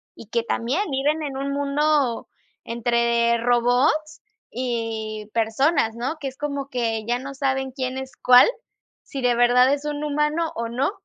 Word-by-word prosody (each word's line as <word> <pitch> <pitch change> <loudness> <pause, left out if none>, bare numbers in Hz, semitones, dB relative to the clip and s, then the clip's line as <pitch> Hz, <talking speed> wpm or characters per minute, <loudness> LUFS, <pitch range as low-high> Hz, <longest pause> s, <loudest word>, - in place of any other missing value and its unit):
Y 225 - -12
que 235 +1 -1
también 270 - -1
viven 290 +3 0
en 280 -3 -4
un 275 +1 -3
mundo 285 -2 +1 0.4
entre 235 0 +1
robots 245 +6 +1 0.3
y 225 -3 -3
personas, 230 +2 +1
¿no?, 245 +7 -3
que 285 - -4
es 260 - -16
como 280 -2 -4
que 230 -4 -1
ya 240 +2 0
no 275 +2 -7
saben 265 -1 -1
quién 255 0 -4
es 265 0 -6
cuál, 250 0 +8 0.6
si 275 - -6
de 245 -1 +2
verdad 245 +2 +5
es 285 +1 -3
un 295 0 -3
humano 300 +2 0
o 230 0 -3
no. 260 +8 0
260 Hz, 165 wpm, -23 LUFS, 235-285 Hz, 0.6 s, cuál